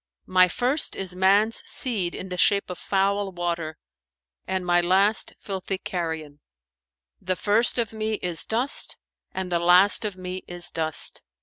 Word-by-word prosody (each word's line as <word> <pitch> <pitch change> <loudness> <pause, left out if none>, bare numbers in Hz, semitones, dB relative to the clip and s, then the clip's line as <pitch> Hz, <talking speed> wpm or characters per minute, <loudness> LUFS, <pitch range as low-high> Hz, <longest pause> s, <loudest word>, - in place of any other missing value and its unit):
"My 185 0 +5
first 250 - 0
is 185 -2 -3
man's 200 +4 +3
seed 200 -9 0
in 190 - -7
the 180 - -4
shape 200 0 +3
of 180 - -7
foul 200 0 0
water 170 -3 -3 0.7
and 190 -1 -2
my 175 0 +3
last 195 +5 +2
filthy 195 -1 -4
carrion: 160 -6 -5 0.8
the 185 0 -1
first 215 +7 +2
of 230 -3 -1
me 220 0 -2
is 175 -5 -1
dust 240 +5 -1 0.3
and 190 -1 -4
the 170 - +2
last 180 +5 +5
of 205 -3 -3
me 185 0 -6
is 175 0 -3
dust. 160 -1 -1
185 Hz, 150 wpm, -25 LUFS, 175-205 Hz, 0.8 s, My